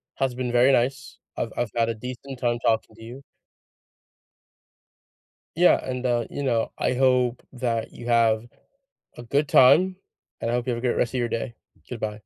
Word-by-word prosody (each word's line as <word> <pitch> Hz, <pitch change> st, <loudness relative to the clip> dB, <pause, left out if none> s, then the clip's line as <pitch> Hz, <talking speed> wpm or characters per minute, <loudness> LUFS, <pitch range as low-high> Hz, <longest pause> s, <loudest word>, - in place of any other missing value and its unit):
has 135 Hz, -2 st, -1 dB
been 125 Hz, -1 st, -3 dB
very 125 Hz, +3 st, +5 dB
nice. 135 Hz, +2 st, 0 dB, 0.2 s
I've 115 Hz, -, -2 dB
I've 120 Hz, -4 st, -1 dB
had 115 Hz, 0 st, +1 dB
a 115 Hz, -, -2 dB
decent 125 Hz, +3 st, -8 dB
time 120 Hz, -1 st, 0 dB
talking 110 Hz, -2 st, 0 dB
to 115 Hz, -, -14 dB
you 125 Hz, +4 st, -10 dB, 2.4 s
Yeah, 180 Hz, +1 st, +6 dB
and, 130 Hz, 0 st, -3 dB
uh, 120 Hz, -1 st, +1 dB
you 145 Hz, -, -5 dB
know, 120 Hz, -4 st, 0 dB
I 125 Hz, -, 0 dB
hope 125 Hz, -1 st, +2 dB
that 120 Hz, -3 st, -2 dB
you 120 Hz, -, -10 dB
have 115 Hz, -1 st, +2 dB, 0.7 s
a 120 Hz, -, -8 dB
good 140 Hz, +5 st, 0 dB
time, 185 Hz, +9 st, +5 dB, 0.5 s
and 115 Hz, -, -1 dB
I -, -, -1 dB
hope 125 Hz, +1 st, -1 dB
you -, -, +1 dB
have -, -, -3 dB
a -, -, -8 dB
great 120 Hz, -, +1 dB
rest 120 Hz, -, 0 dB
of 130 Hz, -, -1 dB
your 120 Hz, -1 st, -1 dB
day, 115 Hz, 0 st, -4 dB, 0.3 s
goodbye. 110 Hz, -3 st, -4 dB
120 Hz, 185 wpm, -24 LUFS, 115-130 Hz, 2.4 s, Yeah